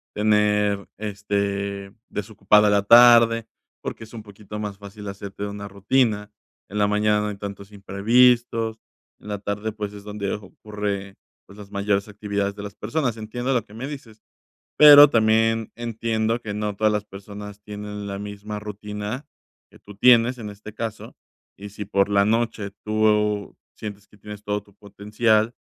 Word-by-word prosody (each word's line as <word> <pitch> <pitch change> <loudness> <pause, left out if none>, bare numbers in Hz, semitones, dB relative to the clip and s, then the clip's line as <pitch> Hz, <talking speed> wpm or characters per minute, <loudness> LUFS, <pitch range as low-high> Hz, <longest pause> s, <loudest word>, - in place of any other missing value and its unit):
tener, 105 -1 +2
este, 100 -1 -3 0.2
desocupada 105 0 +2
la 100 -1 +3
tarde, 115 0 +7 0.3
porque 110 - -6
es 110 - -18
un 110 -2 -8
poquito 105 0 -10
más 105 -2 -5
fácil 100 0 -10
hacerte 100 0 -6
una 100 0 -6
rutina, 105 +1 0 0.4
en 105 +2 -3
la 105 - +3
mañana 105 0 +2
no 105 - -2
hay 105 -1 -5
tantos 100 0 -8
imprevistos, 115 +3 +2 0.4
en - - -15
la 105 - -2
tarde, 105 +2 -3
pues, 105 -1 -6
es 100 - -10
donde 105 -1 -4
ocurre, 100 -1 -5 0.3
pues, 100 - -16
las 100 -1 -11
mayores 100 0 0
actividades 100 -1 -3
de 100 - -8
las 100 -1 -7
personas. 120 +1 -2
Entiendo 120 +4 -3
lo 120 -4 +1
que 105 - -17
me 130 +5 -5
dices, 120 -7 -10 0.6
pero 145 -1 +10
también 115 -1 +2
entiendo 115 0 -1
que 105 -2 -5
no 105 0 -2
todas 110 +1 +2
las 105 -1 -1
personas 105 0 -10
tienen 105 -1 -7
la 100 0 -5
misma 105 +1 -6
rutina 105 +4 -6 0.4
que - - -18
tú 105 - -14
tienes 120 +2 +5
en 105 -3 -6
este 105 +1 -11
caso, 110 -1 -6 0.4
y 100 +1 -9
si 105 +1 -7
por 100 0 +1
la 100 0 +4
noche 110 -2 0
tú 105 -1 +1 0.2
sientes 105 -1 -8
que - - -21
tienes 105 0 -10
todo 105 0 -1
tu 100 - -23
potencial 105 +3 0
105 Hz, 165 wpm, -23 LUFS, 100-110 Hz, 0.6 s, pero